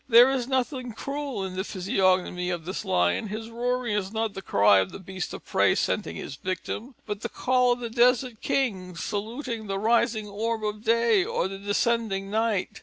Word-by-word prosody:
There 240 +3 +8
is 255 -3 -1
nothing 255 -2 -1
cruel 275 -2 -4
in 185 -1 -6
the 190 - -1
physiognomy 185 -2 +1
of 175 -3 -3
this 185 - -4
lion: 90 - +1
his 220 +3 -6
roaring 245 0 -1
is 195 -2 -2
not 220 -1 -1
the 195 - -6
cry 100 - +5
of 95 0 -1
the - - -7
beast 190 -1 -5
of - - -8
prey - - +3
scenting 80 - -1
his 135 - -6
victim, 210 - -4
but 210 -1 -4
the - - -3
call 250 -1 +2
of 245 - -7
the 235 - -3
desert 245 -1 +3
king, 190 -10 -1
saluting 220 - -4
the 195 0 -2
rising 220 0 +2
orb 220 +2 -2
of 210 0 -3
day 230 -3 +4
or 175 - -1
the 195 0 -7
descending 205 -1 0
night. 220 -3 0
215 Hz, 190 wpm, -26 LUFS, 190-240 Hz, -, There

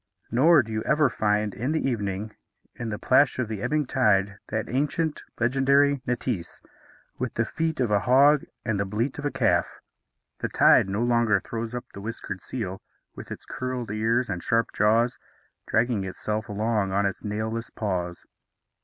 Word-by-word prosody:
Nor 145 +5 +5
do 110 - -9
you 110 0 -1
ever 150 -1 +2
find 105 -1 0
in 130 +6 -2
the 160 - 0
evening, 105 -3 -3 0.4
in 120 -2 -5
the 105 - -3
plash 130 +5 +3
of 125 -3 -1
the 105 -2 -5
ebbing 150 +4 0
tide, 105 -6 +2
that 110 0 -2
ancient, 150 +4 -1 0.2
legendary 135 +3 +3
neitse, 120 -7 -3 0.6
with - - -3
the - - +1
feet 160 -1 -2
of 120 -4 +1
a 105 - +4
hog 140 +5 +5 0.2
and 110 -3 0
the 100 - 0
bleat 115 +8 -2
of 145 - -5
a - - 0
calf. - - +2 0.7
The - - -2
tide - - +5
no 105 +4 -1
longer 115 -4 +3
throws 115 +4 -5
up 125 - -5
the 100 - -8
whiskered 100 -3 -5
seal, 95 -7 -5 0.3
with - - -9
its - - -8
curled 125 -4 -4
ears 115 +3 +1
and 90 -3 -3
sharp 115 +3 +1
jaws, 115 +3 +2 0.5
dragging 115 -3 +1
itself 105 +3 -4
along 105 -1 0
on 100 +1 +1
its 100 - -3
nailless 110 +2 -3
paws. 90 -4 -3
115 Hz, 170 wpm, -26 LUFS, 105-130 Hz, 0.7 s, Nor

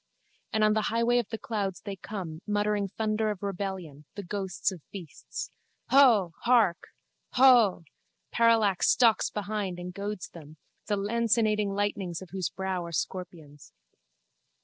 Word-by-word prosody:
And 220 - +1
on 215 0 +4
the 215 - +1
highway 235 +2 +2
of 235 - -3
the 225 - -4
clouds 200 -5 -3
they 200 -2 -6
come, 180 -5 -7
muttering 205 -1 0
thunder 215 +2 -1
of 205 -2 -5
rebellion, 185 -7 -5
the 200 - -6
ghosts 190 0 -2
of 180 -4 -9
beasts. 180 -7 -8 0.4
Huuh! 235 -10 +6
Hark! 230 -8 +3 0.5
Huuh! 245 -9 +6 0.5
Parallax 225 -5 +3
stalks 230 -3 +4
behind 205 -3 -3
and 180 0 -7
goads 200 0 -5
them, 155 -2 -13 0.3
the 205 -1 0
lancinating 215 0 +1
lightnings 195 -3 -2
of 190 - -11
whose 185 -2 -2
brow 190 -1 -3
are 170 - -7
scorpions. 165 -4 -6
200 Hz, 140 wpm, -28 LUFS, 180-215 Hz, 0.5 s, Huuh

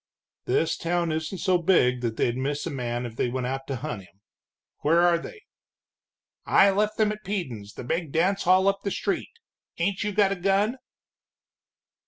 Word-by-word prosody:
"This 165 0 +1
town 170 0 0
isn't 160 +4 -3
so 180 -1 +2
big 125 -8 +3
that 115 -2 -2
they'd 120 - +1
miss 140 +3 -2
a 170 - -3
man 120 -2 -3
if 115 -2 -7
they 125 - 0
went 125 0 -3
out 135 +1 -4
to 135 - -2
hunt 115 -3 -5
him. 95 +1 -21 0.6
Where 165 +3 +3
are 175 -1 +4
they?" 420 - -10 1.0
"I 195 - +5
left 210 +2 0
them 215 -1 +3
at 215 0 -7
Peden's, 130 - -5
the - - -7
big 160 +4 -2
dance 190 +6 +1
hall 185 +2 +5
up 195 0 +2
the 200 - -1
street. - - -2 0.5
Ain't 190 +4 0
you 210 - -1
got 200 -1 +3
a - - 0
gun?" 200 +6 +1
170 Hz, 185 wpm, -26 LUFS, 130-195 Hz, 1.0 s, I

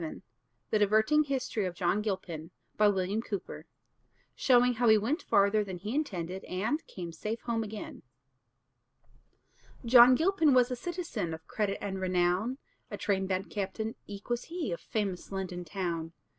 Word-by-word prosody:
VII 320 - -6 0.5
THE 215 - +3
DIVERTING 220 +9 +4
HISTORY 255 -7 -1
OF 175 - -6
JOHN 175 +4 +1
GILPIN 185 -6 -4 1.9
SHOWING 250 -1 +4
HOW 240 +1 +1
HE 220 - +7
WENT 260 - -1
FARTHER 200 +1 +3
THAN 190 -3 -6
HE 210 +6 -5
INTENDED 190 - -3
AND 215 - -2
CAME 175 -3 -7
SAFE 215 +7 -4
HOME 230 -2 -1
AGAIN 210 0 -7 1.8
John 245 +1 +8
Gilpin 320 -3 +3
was 250 0 +4
a - - 0
citizen 245 - -4
Of 160 - -15
credit 205 -2 -1
and 195 -2 -3
renown, 185 +6 +1 0.3
A - - -5
train 195 -2 0
band 190 +1 -2
captain 210 +2 -3
eke 200 0 -9
was 240 0 -1
he 335 - -4
Of 170 - -4
famous 200 -5 -3
London 185 -2 -4
town. 170 -1 -3
210 Hz, 145 wpm, -30 LUFS, 185-245 Hz, 1.9 s, John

